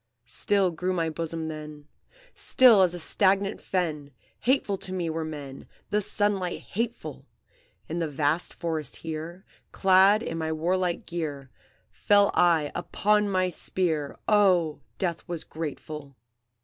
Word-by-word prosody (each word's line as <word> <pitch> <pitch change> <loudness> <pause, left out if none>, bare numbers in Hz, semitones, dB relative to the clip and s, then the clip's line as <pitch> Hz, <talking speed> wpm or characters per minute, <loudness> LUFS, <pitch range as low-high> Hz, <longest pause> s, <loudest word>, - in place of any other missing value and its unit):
"Still 195 +8 +1
grew 180 +3 -2
my 165 -3 -1
bosom 165 0 -4
then, 150 -1 -8 0.5
Still 240 -6 +5
as 180 -2 +3
a - - -5
stagnant 195 +4 +1
fen! 155 -6 -2 0.3
Hateful 235 -6 +1
to 185 - -5
me 175 -3 -2
were 160 0 -3
men, 145 -4 -8 0.2
The 210 - +2
sunlight 200 -3 -1
hateful! 230 +3 -5 0.6
In 165 +2 -3
the 165 - 0
vast 150 +3 0
forest 160 -4 -4
here, 165 +4 -6 0.3
Clad 195 +3 +5
in 165 -6 -4
my 160 0 -2
warlike 175 +2 -1
gear, 145 -6 -5 0.4
Fell 205 -1 +3
I 165 -4 +3
upon 210 +4 +1
my 185 -1 +1
spear, 160 -4 -1
Oh, 185 -7 +3 0.2
death 170 -3 -2
was 170 -3 -3
grateful! 150 -2 -7
170 Hz, 135 wpm, -27 LUFS, 155-190 Hz, 0.6 s, Still